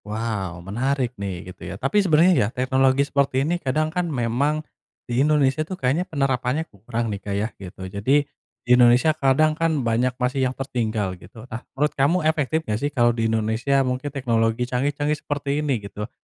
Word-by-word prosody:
Waw, 105 -5 -4
menarik 125 +5 -1
nih, 95 -2 -5
gitu - - -32
ya. - - -5
Tapi 135 - +2
sebenarnya 175 0 +5
ya, 105 - +3
teknologi 130 +2 +2
seperti 140 -1 +1
ini 175 +3 -1
kadang 155 +4 0
kan 180 -1 -1
memang 140 +4 0 0.4
di 120 +2 0
Indonesia 145 -1 +3
tuh 180 +4 -4
kayaknya 150 +7 0
penerapannya 135 0 0
kurang 115 +2 -3
nih, 100 - -6
Kak. 100 - -4
Yah, 110 +3 -1
gitu. 95 0 -10
Jadi, 120 +10 +1 0.4
di - - -14
Indonesia 125 +6 +5
kadang 155 +2 +3
kan 155 -4 0
banyak 120 +2 +1
masih 130 +1 0
yang 130 - -7
tertinggal, 110 -7 -2
gitu. 110 +6 -12
Nah, 120 -1 -7 0.2
menurut 150 +2 +1
kamu 140 +6 +2
efektif 155 0 +1
enggak 105 0 -1
sih 145 - 0
kalau 120 -4 +2
di 115 -1 0
Indonesia 110 +5 +1
mungkin 130 +3 -2
teknologi 120 -3 0
canggih-canggih 145 +4 -1
seperti 145 0 -2
ini, 140 -4 0
gitu? 105 +2 -6
130 Hz, 180 wpm, -23 LUFS, 115-145 Hz, 0.4 s, sebenarnya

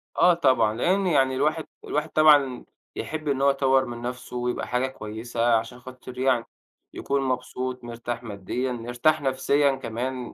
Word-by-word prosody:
آه، 180 - +5
طبعًا، 130 -10 +2
لأن 185 - +1
يعني 135 -5 +3
الواحد 155 +4 0 0.2
الواحد 150 +2 -2
طبعًا، 145 -5 +4 0.3
يحِب 155 -1 -5
إن 135 -2 0
هو 140 - +5
يطوِّر 135 -1 +3
من 120 -1 -7
نَفْسه، 125 0 -6
ويبقى 125 0 -2
حاجة 125 +1 0
كويسة، 115 0 -2
عشان 115 +2 -3
خاطر 125 0 -11
يعني، 130 -2 +2 0.5
يكون 140 0 -1
مبسوط، 130 -1 -3
مرتاح 120 0 -5
ماديًا، 115 +4 -3
مرتاح 120 +6 0
نَفْسيًا 140 +1 +2
كمان 125 0 -5
130 Hz, 150 wpm, -25 LUFS, 120-140 Hz, 0.5 s, آه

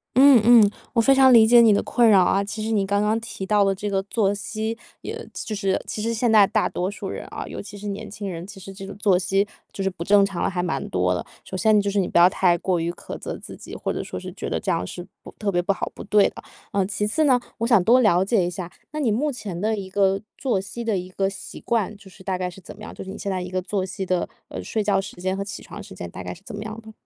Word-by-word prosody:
嗯 265 -2 +8
嗯。 225 -3 +7 0.2
我 230 - +4
非 270 - +5
常 265 -1 +6
理 225 -2 +8
解 240 +1 +7
你 230 -2 +6
的 205 - +3
困 240 -2 +3
扰 190 -3 +6
啊， 195 +2 +2
其 215 +2 -5
实 220 - -2
你 210 -3 +2
刚 200 +1 +1
刚 215 +2 +1
提 225 -4 -7
到 205 0 +3
的 195 0 +2
这 205 +2 -5
个 195 -1 0
作 200 -1 +1
息， 215 +2 -4 0.3
也 - - -5 0.2
就 215 - -5
是 195 -2 0
其 210 - -4
实 230 - -1
现 230 0 +1
在 210 -3 +7
大 215 +1 +1
多 180 +1 -2
数 205 -1 -6
人， - - -5
啊， - - -6
尤 - - -6
其 205 0 -10
是 205 +1 -7
年 200 0 -5
轻 205 0 -6
人， 170 0 -6
其 200 -1 -11
实 195 +1 -10
这 195 0 -9
种 200 - -8
作 200 -3 +3
息 195 +2 +1 0.2
就 195 - -4
是 195 - +1
不 170 -2 -6
正 200 +1 +5
常 195 -3 -4
了， - - +1
还 180 -1 -2
蛮 175 - -2
多 90 0 +1
的。 90 - -3 0.2
首 - - -8
先 215 +2 +4
就 200 0 0
是 200 - +1
你 185 - +1
不 - - 0
要 175 - +8
太 180 -2 +2
过 180 0 0
于 170 +1 -1
苛 - - -8
责 - - -5
自 - - -10
己， - - -10
或 - - -3
者 - - -3
说 - - -6
是 - - -8
觉 - - -5
得 - - -1
这 - - -1
样 90 - 0
是 175 - -7 0.2
不 - - -11
特 205 -2 -1
别 175 - +1
不 190 +3 +1
好， 195 - -3
不 - - -9
对 205 0 +4
的。 - - -12 0.3
嗯， 195 -2 +1
其 210 +1 -2
次 260 +9 +1
呢， 255 -3 +4 0.2
我 230 - 0
想 230 -7 +5
多 240 +7 +5
了 185 -4 +4
解 205 -2 +2
一 - - -1
下， 180 0 -6 0.2
那 305 - -4
你 255 -7 +1
目 280 +8 0
前 195 -8 -6
的 215 +2 0
一 195 -2 -5
个 195 0 +2 0.2
作 240 -8 0
息 205 +5 -6
的 225 -4 0
一 180 0 -5
个 195 +1 0
习 195 - -9
惯， 215 -3 -1
就 200 -1 -15
是 190 0 -16
大 185 -1 -1
概 180 -1 -1
是 180 - -12
怎 185 - -12
么 210 - -16
样？ - - -8
就 - - -7
是 190 - -8
你 205 - -8
现 200 - -3
在 185 - -1
一 180 - -6
个 185 - -1
作 190 0 -2
息 190 +1 -5
的 185 -1 0 0.2
呃， - - -7
睡 220 - -2
觉 200 -1 +2
时 195 0 -6
间 185 +1 -1
和 200 - -2
起 200 - -7
床 - - -9
时 - - -12
间 90 -1 -7
大 90 - -8
概 - - -5
是 180 - -16
怎 205 - -8
么 205 - -5
样 220 +1 -7
的？ 220 0 -12
200 Hz, 330 characters per minute, -23 LUFS, 190-220 Hz, 0.3 s, 嗯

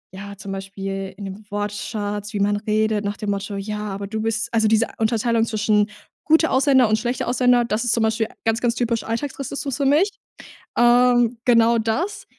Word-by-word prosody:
ja, 200 +1 -8
zum 200 -2 -8
Beispiel 195 0 -5
in 200 - -7
den 195 +2 -8
Wortschatz, 205 0 -4
wie 205 - -2
man 205 +1 +2
redet 215 0 0
nach 205 0 -3
dem 210 -1 -2
Motto: 200 0 -4
„Ja, 210 +1 -4
aber 200 0 -5
du 215 +2 -4
bist 225 +1 -2
"also, 220 -1 +3
diese 220 +1 +3
Unterteilung 225 +1 +1
zwischen 215 -2 +1 0.3
gute 320 +1 +3
Ausländer 260 -2 +4
und 215 0 +2
schlechte 250 +2 -2
Ausländer, 245 -1 +3
das 225 +1 -1
ist 240 - +1
zum 230 - +1
Beispiel 220 0 +1 0.2
ganz, 225 +1 +1
ganz 240 -1 +1
typisch 235 -1 -1
alltagsrassistisch 275 +2 -4
für 280 - -1
mich. 335 +9 +3 0.6
Ähm, 240 0 +4
genau 235 -1 +4
das. 230 - -2
220 Hz, 185 wpm, -22 LUFS, 205-240 Hz, 0.6 s, Ausländer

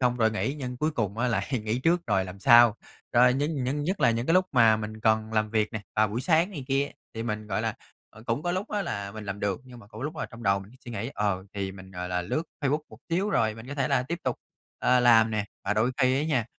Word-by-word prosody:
xong 125 -1 +2
rồi 110 -2 +3
nghỉ 135 +6 -1
nhưng 125 -2 -5
cuối 155 +4 0
cùng 110 -5 -2
á 125 +1 +1
lại 100 -4 -1 0.2
nghỉ 110 +3 0
trước 170 +5 +3
rồi 95 -3 +2
làm 95 +1 -9
sau. 120 -1 +7 0.4
Rồi 125 +1 +6
nhưng 145 -1 -1
những 145 +3 -1
nhất 190 +4 -1
là 120 - +5
những 115 +2 -1
cái 165 - +3
lúc 185 0 +5
mà 115 -4 +6
mình 110 0 -6
cần 110 0 +2
làm 110 -1 +1
việc 110 -1 0
nè, 110 - -3 0.2
vào 110 -1 +4
buổi 115 +4 -3
sáng 165 +6 +3
này 145 -9 -6
kia, 140 +1 +1 0.2
thì 115 - -3
mình, 105 -2 -3
gọi - - -1
là, - - -1 0.4
ờ, 110 - -15
cũng 120 +6 -1
có 175 - -1
lúc 185 +3 -2
á 205 -1 0
là 100 - -4
mình 110 0 -7
làm 100 0 -5
được, 100 +1 -1
nhưng 125 -2 -12
mà 100 - -14
cũng 110 +1 -11
có 135 - -3
lúc 150 - -4
là - - -3
trong 115 0 -12
đầu 100 -1 +3
mình 100 +2 -11
suy 120 - -8
nghĩ, 115 +5 -4
ờ, 100 -2 -1
thì 95 -1 -3
mình, 95 -1 -12
gọi 90 -1 -5
là, 90 0 -1
lướt 155 - -1 0.2
Facebook 145 +2 +1
một - - -14
xíu 190 +5 0
rồi 110 - +2
mình 115 +1 -11
có 145 - -5
thể 135 -3 0
là 125 - +2
tiếp 170 +7 -4
tục, 130 - 0 0.4
ờ, 125 0 +3
làm 115 -2 +6
nè. 105 -2 -1 0.2
Và 105 +2 0
đôi 110 +4 +2
khi 130 -1 +3
á - - -1
nha, 130 -8 +1
115 Hz, 290 wpm, -27 LUFS, 105-135 Hz, 0.4 s, sau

